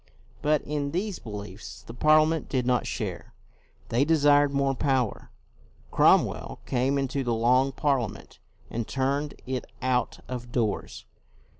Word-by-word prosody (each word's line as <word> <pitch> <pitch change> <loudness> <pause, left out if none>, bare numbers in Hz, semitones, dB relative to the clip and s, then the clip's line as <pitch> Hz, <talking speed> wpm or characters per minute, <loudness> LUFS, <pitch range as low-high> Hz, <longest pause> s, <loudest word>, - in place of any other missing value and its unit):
But 150 0 +2
in 145 -1 -3
these 195 +2 -2
beliefs 105 -2 -8
the 115 - -10
Parliament 155 +4 +3
did 130 -3 0
not 125 -3 +1
share. - - -5 0.5
They 120 +4 +2
desired 145 -2 +4
more 140 -1 +1
power. 130 -4 -1 0.6
Cromwell - - +3
came 130 +2 +1
into 135 0 -1
the 120 -2 0
Long 125 +4 +3
Parliament 135 -4 -2 0.3
and 115 -1 -3
turned 140 +2 -1
it 130 -1 -3
out 125 -2 0
of 120 -1 -6
doors. 110 -5 -2
135 Hz, 130 wpm, -27 LUFS, 125-145 Hz, 0.6 s, desired